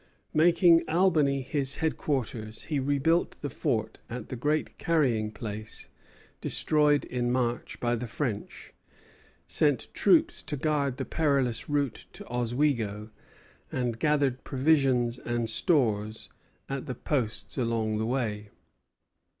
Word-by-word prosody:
Making 170 +1 +5
Albany 155 -6 +3
his 140 -1 +2
headquarters, 120 -8 -2
he 150 -3 -1
rebuilt 145 +5 +1
the 145 - -3
fort 115 -5 -2
at 120 +1 -6
the - - -4
Great 150 +5 -1
Carrying 125 -10 +1
Place 110 -1 -6 0.5
destroyed 150 -1 +2
in 120 -1 -1
March 120 -1 -1
by 120 0 0
the 120 +1 -3
French, 110 -3 -4 0.7
sent 145 -4 0
troops 330 0 +3
to 150 - -4
guard 140 -2 0
the 135 - -3
perilous 140 -7 0
route 145 -4 -1
to - - -9
Oswego, 120 -3 -1 0.6
and 120 -3 -2
gathered 145 -3 +1
provisions 130 -4 +2
and 120 -1 -2
stores 110 - +1 0.4
at 135 +2 -4
the 130 - -4
posts 125 -1 -2
along 115 -3 0
the 110 - -1
way. 110 -5 -2
130 Hz, 120 wpm, -28 LUFS, 115-150 Hz, 0.7 s, Making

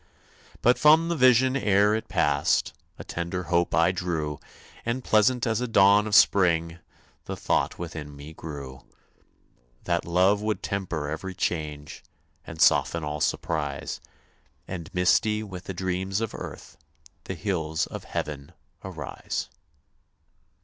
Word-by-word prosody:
But 125 +1 +4
from 160 +2 +5
the 170 - 0
vision 130 -1 +4
ere 105 -4 +3
it 110 - -2
passed - - +1 0.2
A - - -8
tender 85 +2 -4
hope 85 0 +2
I 85 +2 +4
drew, 80 -5 -3 0.4
And, 120 +2 -2
pleasant 120 +3 +3
as 115 0 0
a 125 - -1
dawn 100 -1 +5
of 105 - +1
spring, 85 -4 +4 0.5
The - - -4
thought - - 0
within 80 -4 -7
me 70 +3 -10
grew, 70 -5 -8 1.0
That 85 -1 0
love 95 +4 +2
would 105 0 -2
temper 85 -7 -3
every 90 +5 -5
change, 75 -5 -3 0.5
And 80 - -9
soften 85 0 +3
all 75 0 -4
surprise, 75 -4 -2 0.7
And, 85 -4 -7
misty 105 +4 +2
with 95 -3 -9
the 95 - -5
dreams 95 +2 -2
of 115 -2 -3
earth, - - -9 0.5
The 95 - -4
hills 80 -3 -1
of - - -8
Heaven 75 +2 -5 0.3
arise. - - -5
90 Hz, 135 wpm, -26 LUFS, 80-105 Hz, 1.0 s, from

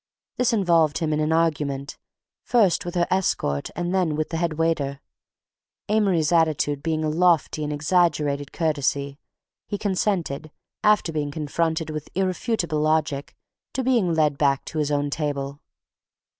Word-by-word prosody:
this 250 - +2
involved 170 -8 +3
him 155 0 -1
in 150 - 0
an 155 +1 0
argument, 150 -4 0 0.5
first 210 -10 +2
with 175 - -5
her 175 -1 +3
escort 170 - 0
and 175 +1 -2
then 180 -5 +1
with 155 0 -2
the 165 - -3
headwaiter—Amory's 165 +3 -2
attitude 155 -4 +2
being 160 0 -1
a - - 0
lofty 165 -1 +2
and 150 - -2
exaggerated 150 -2 +1
courtesy... 140 -3 -1 0.5
he 205 - -3
consented, 185 -7 -1 0.3
after 210 -5 +3
being 150 -2 -2
confronted 160 +2 -2
with 155 -1 -6
irrefutable 185 -3 -1
logic, 155 -2 0 0.4
to 265 - 0
being 235 -9 +2
led 150 -3 +2
back 140 -2 +2
to 155 - -4
his 150 -1 0
own 145 -1 0
table. 140 -2 -3
155 Hz, 140 wpm, -24 LUFS, 145-175 Hz, 0.5 s, involved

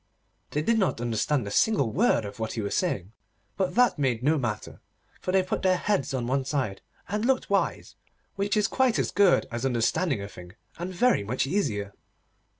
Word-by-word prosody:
They 150 - -1
did 230 +6 +2
not 190 - +1
understand 120 +2 0
a 100 - -5
single 140 - +2
word 175 - +2
of 100 - -8
what 110 0 -3
he 115 - -3
was 100 - -2
saying, 105 - -1 0.4
but 185 -2 -1
that 245 -9 +4
made 125 -4 0
no 155 +4 +3
matter, 115 -5 -4 0.4
for 185 - -3
they 190 0 +3
put 185 - -3
their 185 -1 +3
heads 190 -9 0
on 130 -3 -2
one 135 +2 0
side, 130 -8 -2 0.3
and 210 +3 -2
looked 255 -3 +1
wise, 195 - 0 0.4
which 200 +2 0
is 210 - +3
quite 260 -3 +2
as - - 0
good 200 -3 +4
as 120 +1 -4
understanding 135 - +1
a 100 - -5
thing, 90 -2 -12 0.3
and 175 +2 -4
very 215 - +2
much 125 +5 -1
easier. 110 - -1
140 Hz, 195 wpm, -27 LUFS, -, 0.4 s, that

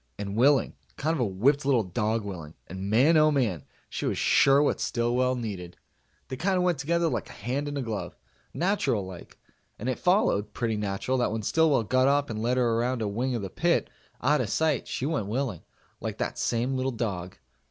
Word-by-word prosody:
And 100 0 -4
willing. 135 +4 +4 0.2
Kind 155 +3 0
of 165 - -2
a 120 - +2
whipped 130 +10 +2
little 135 -5 +3
dog 105 +4 -1
willing, 85 -6 -7
and 95 +2 -6
man 135 +10 +5
oh 155 0 +6
man! 115 - 0 0.2
She - - -3
was - - -1
sure 135 0 +5
what - - +1
Stillwell 125 +2 +1
needed. 100 -7 -6 0.5
They 130 - -5
kind 190 +5 +1
of 180 - +2
went 175 -5 +1
together 170 +4 +1
like 120 -9 -2
a - - -10
hand 130 +7 -3
and 145 0 -4
a 135 - -2
glove 110 -4 -4 0.4
natural 160 - 0
like. 95 -2 -11 0.4
And 115 - -5
it 130 - -1
followed 180 - +2
pretty 115 -3 -1
natural 105 +5 -1
that 120 - +1
when 110 0 -3
Stillwell 155 -2 +3
got 130 +5 +2
up 140 -1 +2
and 110 -1 -4
led 125 +3 +1
her 120 -2 +2
around 120 -1 0
a - - -1
wing 120 +5 -1
of 115 - -3
the 95 - -5
pit, - - +1 0.3
out 150 +4 +3
of - - -2
sight, 155 -5 +1
she 130 - -3
went 145 -10 -1
willing 115 - -2 0.4
like - - -4
that - - -3
same 120 +3 0
little 130 0 0
dog. 95 -6 -4
125 Hz, 210 wpm, -27 LUFS, 105-140 Hz, 0.5 s, oh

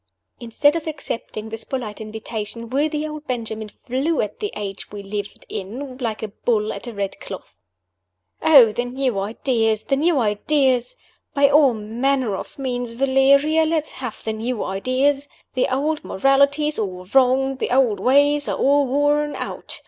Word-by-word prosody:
Instead 260 +6 +2
of 330 -1 -3
accepting 230 -7 -5
this 225 0 -5
polite 225 -6 -5
invitation, 220 +1 -6
worthy 300 +2 0
old 305 0 -8
Benjamin 220 -3 -4
flew 270 +9 -2
at 210 - -2
the 415 - -3
age 200 -2 -6
we 205 -1 -7
lived 205 +1 -6
in 255 +8 -6
like 225 -3 -3
a 220 - -3
bull 215 +1 -1
at - - -8
a 240 - -6
red 200 -1 -3
cloth. - - -9 0.9
"Oh, 270 -8 +7
the 240 +3 -2
new 250 -3 -1
ideas! 225 +1 0
the 275 - +1
new 315 +3 +2
ideas! 255 - +1 0.4
By 280 0 +5
all 285 -5 +5
manner 235 +2 0
of - - -8
means, 245 -3 -3
Valeria, 275 +5 +4
let 315 -1 +1
us - - -7
have 250 -4 -7
the 220 - -2
new 225 +1 -3
ideas! 260 +8 0 0.3
The 255 0 0
old 295 +4 0
morality's 280 +5 +2
all 185 -3 -4
wrong, 265 +4 +3
the - - -2
old 250 -5 +3
ways 285 +2 +3
are - - -1
all 285 0 +3
worn 290 +2 +1
out. - - -5
255 Hz, 165 wpm, -22 LUFS, 220-285 Hz, 0.9 s, Oh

